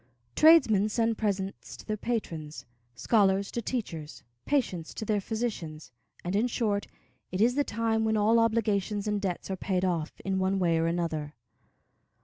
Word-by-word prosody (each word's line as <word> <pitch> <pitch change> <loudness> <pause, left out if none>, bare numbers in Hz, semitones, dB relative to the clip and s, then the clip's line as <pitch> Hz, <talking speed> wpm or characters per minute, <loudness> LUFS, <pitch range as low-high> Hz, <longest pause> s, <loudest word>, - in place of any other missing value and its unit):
Tradesmen 250 -11 +6
send 225 0 0
presents 195 -2 -3
to - - -13
their 215 - -2
patrons, 160 - -4 0.3
scholars 195 - +2
to 235 - -2
teachers, 185 -11 -5 0.2
patients 190 - -1
to 220 - -4
their 210 -1 +1
physicians, 195 -9 -4 0.3
and, 180 +2 -2
in 220 +4 +2
short, 210 -4 -1 0.4
it 185 - -3
is 235 +4 +4
the 285 +2 +2
time 225 -2 0
when 220 0 +1
all 220 +2 +4
obligations 215 -2 +1
and 210 -1 0
debts 190 -1 -3
are - - -1
paid 185 0 -1
off, 170 -3 -2
in 190 -1 0
one 190 +1 +1
way 170 -3 +2
or 165 - +1
another. 160 -3 -2
205 Hz, 160 wpm, -28 LUFS, 180-225 Hz, 0.4 s, Tradesmen